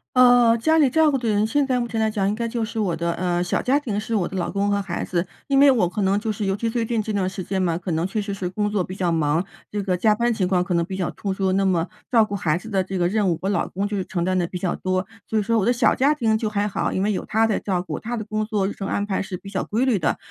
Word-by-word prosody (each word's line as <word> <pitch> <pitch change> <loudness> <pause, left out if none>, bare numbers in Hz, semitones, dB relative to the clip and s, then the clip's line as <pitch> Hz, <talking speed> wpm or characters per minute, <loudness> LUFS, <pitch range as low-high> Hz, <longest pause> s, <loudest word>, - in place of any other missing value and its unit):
呃， 245 -2 +6
家 315 +8 +2
里 295 -4 +5
照 315 +2 +4
顾 270 - +1
的 240 -3 -3
人， 210 -1 +2
现 275 +5 +1
在 255 -2 +1
目 240 -1 -2
前 225 -1 -2
来 220 - +2
讲 210 -3 -1
应 - - 0
该 230 +2 -2
就 230 0 -2
是 225 +1 -4
我 190 -6 0
的， 170 +1 -1
呃 175 -1 0
小 175 - -1
家 265 +3 +2
庭 220 -8 -2
是 225 +1 -3
我 195 -5 +1
的 190 - -5
老 175 -1 -1
公 200 +1 0
和 200 0 +1
孩 185 -3 -4
子。 175 0 -1 0.2
因 275 -1 +3
为 280 0 +7
我 225 -10 +3
可 200 +3 -2
能 195 +1 +2
就 220 +1 -2
是 205 0 -3
尤 195 0 +1
其 230 +2 -2
最 230 0 -1
近 225 -1 -1
这 215 - -4
段 195 -3 0
时 190 -1 -6
间 190 +1 -2
嘛， 170 -2 +1
可 175 +1 -5
能 165 +2 0
确 210 +2 -2
实 200 0 -4
是 195 -2 -3
工 205 +2 -1
作 205 -3 +1
比 185 +1 -5
较 180 -3 0
忙， 160 +2 +1 0.2
这 205 -1 -3
个 185 -2 0
加 210 +3 +3
班 235 +2 +1
情 200 -5 0
况 180 -1 +2
可 180 - -3
能 170 -1 +1
比 190 +2 -5
较 185 -3 -2
突 195 -2 -3
出， 190 -1 0
那 195 +1 +2
么 175 -3 +1 0.2
照 230 -3 +5
顾 210 -1 -4
孩 165 -5 0
子 220 +5 -9
的 195 -3 +1
这 190 +1 -4
个 175 -1 +1
任 205 -1 +1
务， 165 - 0
我 190 - -1
老 205 - 0
公 195 +3 -3
就 205 -1 -2
承 175 -2 -2
担 185 +1 +1
得 175 - 0
比 180 - -5
较 180 0 -1
多。 185 0 -1 0.2
所 220 - -1
以 210 - +2
说 230 +2 +1
我 200 - +1
的 240 - +3
小 240 -1 +3
家 280 +3 +3
庭 220 -6 +1
就 220 -1 -2
还 205 -1 0
好， 205 - -1
因 190 - 0
为 210 - +1
有 190 - -3
他 220 +1 +2
在 220 -2 0
照 185 -3 -1
顾， - - -5
他 235 +2 -4
的 220 - -3
工 215 0 -2
作 210 -3 0
日 - - -4
程 195 -1 -5
安 200 - -1
排 195 -2 -1
是 190 -1 -5
比 195 +2 -9
较 190 -2 -2
规 225 +4 0
律 235 -7 +2
的， 155 - 0
205 Hz, 360 characters per minute, -23 LUFS, 185-225 Hz, 0.2 s, 为